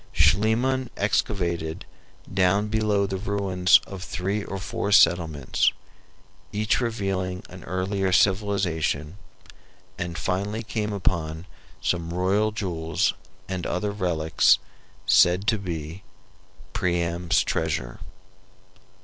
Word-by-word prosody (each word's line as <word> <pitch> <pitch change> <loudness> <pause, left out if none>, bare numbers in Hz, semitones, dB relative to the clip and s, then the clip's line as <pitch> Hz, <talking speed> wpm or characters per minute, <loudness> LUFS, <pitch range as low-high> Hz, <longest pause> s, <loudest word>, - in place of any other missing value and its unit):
Schliemann 115 - +2
excavated 85 -5 -1 0.5
down 95 +3 +2
below 105 -2 +1
the 95 -1 -3
ruins 95 -3 +3
of 95 -2 -8
three 95 +3 -2
or 95 - -5
four 100 +2 -3
settlements, 80 -7 +4 0.8
each 105 +4 +1
revealing 95 -5 -2
an 90 -2 -11
earlier 95 +2 -1
civilization, 95 -5 +1 0.8
and 85 -1 -4
finally 100 +5 -2
came 105 -1 -3
upon 85 -4 -2 0.4
some 85 -1 -1
royal 100 +4 +2
jewels 85 -6 -1 0.3
and 95 -2 -3
other 100 +3 -1
relics 85 -6 +3 0.5
said 90 +3 +5
to 110 -1 +2
be 85 -2 -5 0.7
"Priam's 85 -1 +1
Treasure." - - -2
95 Hz, 100 wpm, -25 LUFS, 85-100 Hz, 0.8 s, said